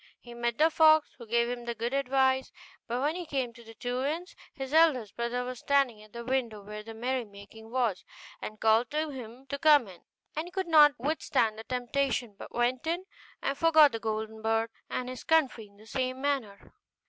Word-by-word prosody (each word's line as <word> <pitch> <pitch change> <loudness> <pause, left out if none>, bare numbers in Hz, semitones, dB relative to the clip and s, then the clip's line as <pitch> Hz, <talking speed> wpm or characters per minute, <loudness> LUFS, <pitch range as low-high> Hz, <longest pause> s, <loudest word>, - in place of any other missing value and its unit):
He 240 - -12
met 235 -1 -2
the 320 +2 +4
fox, 315 -1 +5
who 235 - -10
gave 235 +1 +2
him 240 0 -4
the 235 0 -3
good 235 +3 -3
advice: 265 -1 +2 0.4
but 240 +2 -2
when 295 +3 +1
he 355 -2 -5
came 265 -5 -2
to 235 - -14
the 225 0 -13
two 245 +2 -3
inns, 330 +6 -3 0.2
his 270 -1 -6
eldest 295 -10 +4
brother 235 +1 -2
was 250 -1 -6
standing 275 -6 +1
at 215 0 -16
the 235 +1 -7
window 235 -5 -1
where 210 +1 -7
the 225 +1 -10
merrymaking 220 -3 -5
was, 235 -6 0 0.4
and 215 0 -7
called 225 +2 +3
to 305 0 -1
him 250 0 -9
to 280 +1 -5
come 295 -5 +6
in; 180 -3 -13 0.3
and 310 +3 -3
he - - -11
could 380 0 -2
not 300 -3 +7
withstand 245 -5 0
the - - -7
temptation, 250 -2 -1
but - - -10
went 245 +4 0
in, 345 +3 -1 0.4
and 275 +1 -1
forgot 315 -3 +6
the 225 - -4
golden 220 0 -4
bird 225 +1 0 0.2
and 250 - -3
his 255 0 -7
country 275 -9 +2
in 200 0 -24
the 215 - -16
same 255 +2 -2
manner. 265 -8 -3
250 Hz, 205 wpm, -29 LUFS, 225-280 Hz, 0.4 s, not